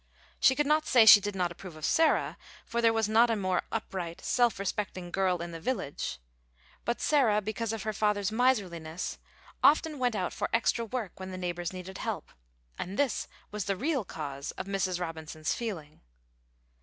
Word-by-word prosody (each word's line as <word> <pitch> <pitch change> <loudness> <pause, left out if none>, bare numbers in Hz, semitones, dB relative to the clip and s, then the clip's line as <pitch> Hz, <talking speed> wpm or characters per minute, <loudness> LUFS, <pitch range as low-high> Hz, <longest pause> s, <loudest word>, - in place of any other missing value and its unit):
She 265 - +5
could 295 - +1
not 305 +1 +2
say 235 -3 +6
she 210 -1 +10
did 205 0 -3
not 180 -2 0
approve 175 -1 -10
of 155 - -5
Sarah, 320 -1 +3 0.3
for 235 +1 -1
there 230 -1 +5
was 225 -1 +1
not 225 +2 +5
a 225 - +2
more 185 -3 0
upright, 185 -6 -4
self 240 -2 +2
respecting 195 -2 -3
girl 185 -2 +1
in 170 - -6
the 165 - -7
village. 165 - -3 0.7
But 235 - -1
Sarah, 250 -9 +3
because 215 +2 -3
of 225 -3 -4
her 215 0 -2
father's 210 -1 +1
miserliness, 185 -9 0 0.4
often 305 0 +4
went 245 -3 +1
out 185 -3 -2
for - - -2
extra 230 0 +2
work 225 -6 -5
when 190 0 -6
the 185 - -6
neighbors 175 -1 -3
needed 185 0 -8
help, - - -4 0.5
and 195 +3 -4
this 280 -5 0 0.2
was 210 -2 -3
the 195 -2 -1
real 280 - 0
cause 140 -6 -6
of - - -6
Mrs. 190 -2 -1
Robinson's 160 -2 -3
feeling. 175 -11 -6
200 Hz, 180 wpm, -29 LUFS, 180-230 Hz, 0.7 s, she